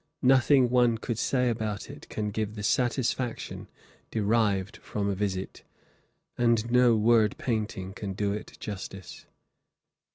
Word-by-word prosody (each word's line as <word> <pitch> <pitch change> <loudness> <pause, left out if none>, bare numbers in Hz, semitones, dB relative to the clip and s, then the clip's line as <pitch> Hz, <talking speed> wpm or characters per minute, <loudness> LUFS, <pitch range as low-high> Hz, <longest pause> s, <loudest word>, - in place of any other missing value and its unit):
Nothing 130 -1 +5
one 120 -2 +4
could 115 0 -4
say 125 -1 +1
about 110 -3 -2
it - - -11
can 105 -1 -3
give 110 0 -3
the 105 - -6
satisfaction 125 +1 -1 0.4
derived 105 -2 +1
from 100 -1 -3
a 100 - +1
visit, 95 -1 -3 0.8
and 115 -1 +2
no 125 -1 +5
word 110 -1 +3
painting 105 -5 -3
can 100 -1 -5
do 100 +1 -1
it 105 - -7
justice. 95 -3 -8
110 Hz, 130 wpm, -28 LUFS, 100-120 Hz, 0.8 s, Nothing